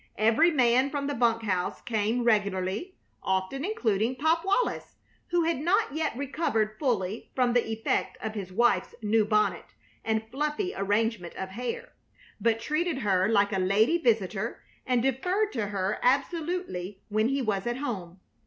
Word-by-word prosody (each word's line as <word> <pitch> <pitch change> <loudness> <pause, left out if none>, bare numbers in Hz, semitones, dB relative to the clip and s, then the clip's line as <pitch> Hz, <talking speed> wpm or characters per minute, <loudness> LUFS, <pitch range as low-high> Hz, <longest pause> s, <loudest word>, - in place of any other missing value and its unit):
Every 225 +10 +4
man 255 -3 +3
from 280 -1 -3
the 285 - -1
bunk 230 -3 +2
house 185 -4 -1
came 225 +1 -1
regularly, 205 - 0 0.3
often 190 +9 -1
including 240 - 0
Pop 320 +5 +2
Wallis, 400 +6 0 0.3
who 345 -1 +2
had 330 -4 0
not 355 +2 +1
yet 310 -5 -1
recovered 240 -7 -1
fully 225 -7 -1
from 250 -2 +2
the 245 -1 +3
effect 225 0 -1
of 220 - -4
his 195 -4 -6
wife's 235 +5 +2
new 215 +1 +3
bonnet 215 0 0 0.3
and 220 0 0
fluffy 300 +7 -1
arrangement 205 -2 -1
of 190 - -5
hair, 235 +5 -5 0.5
but 225 -1 +2
treated 305 +7 -1
her 195 -5 +2
like 205 -1 +3
a 190 - +1
lady 215 - +3
visitor 220 - 0 0.2
and 250 -2 +2
deferred 360 - +1
to 225 -5 -2
her 195 0 -2
absolutely 275 - -1
when 215 +2 +2
he 275 0 0
was 205 -2 -1
at 240 +1 -1
home. 195 -10 -5
230 Hz, 155 wpm, -28 LUFS, 205-280 Hz, 0.5 s, Every